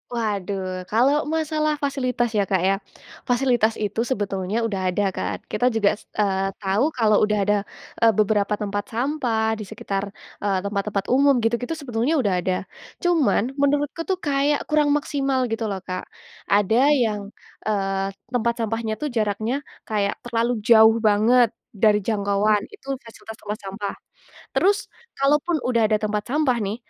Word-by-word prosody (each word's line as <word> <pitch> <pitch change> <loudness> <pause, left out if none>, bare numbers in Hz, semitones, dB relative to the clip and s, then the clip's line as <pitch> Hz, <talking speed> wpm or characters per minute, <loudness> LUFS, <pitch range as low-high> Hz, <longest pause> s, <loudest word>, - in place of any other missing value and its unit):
Waduh, 195 -4 -3
kalau 270 +8 +2
masalah 310 -1 0
fasilitas 255 -4 0
ya, 205 -3 +1
Kak, 190 -2 +1
ya. 195 +1 +3 0.5
Fasilitas 245 -3 +2
itu 210 +1 -3
sebetulnya 205 -1 -1
udah 195 -4 -1
ada 185 +3 0
kan, - - -3 0.2
kita 250 - +1
juga 205 -2 +4
se - - -21
eee, 195 -2 +1 0.2
tau 200 +8 +2
kalau 215 -3 +3
udah 210 - +1
ada, 205 +1 +2 0.4
eee, 225 -2 +4
beberapa 210 0 +2
tempat 205 0 -3
sampah 230 -4 -1
di 210 - -6
sekitar, 200 -2 -3 0.4
eee, 195 -2 0
tempat-tempat 200 0 -2
umum, 275 +1 +5
gitu-gitu 235 +7 0
sebetulnya 270 0 -1
udah 220 -10 +1
ada, 185 +1 0 0.5
cuman 310 - +2
menurutku, 290 +3 +1
tuh, 380 - +1
kayak 285 +1 +1
kurang 295 -1 +3
maksimal 275 -2 0
gitu, 225 0 -1
loh, 195 -2 -4
Kak. 185 -1 -5 0.4
Ada 220 +6 +3 0.2
yang, 210 -2 -1 0.5
eee, 195 -2 0 0.2
tempat 235 -1 +1
sampahnya, 225 0 -2
tuh, 300 +2 -4
jaraknya 220 +3 -1 0.2
kayak 205 -2 -1
terlalu 235 0 0
jauh 220 -1 +7
banget 220 +3 +4 0.3
dari 210 0 +4
jangkauan. 205 0 +1
Itu 275 -9 -5
fasilitas 220 -1 -11
tempat 210 0 -4
sampah. 195 +1 -4 0.6
Terus, 400 +2 +1 0.3
kalau 275 +2 +3
pun 340 +2 -1
udah 235 -3 +2
ada 215 - +3
tempat 210 0 -1
sampah 275 -2 +2
nih, 205 +1 -2
220 Hz, 150 wpm, -23 LUFS, 205-265 Hz, 0.6 s, jauh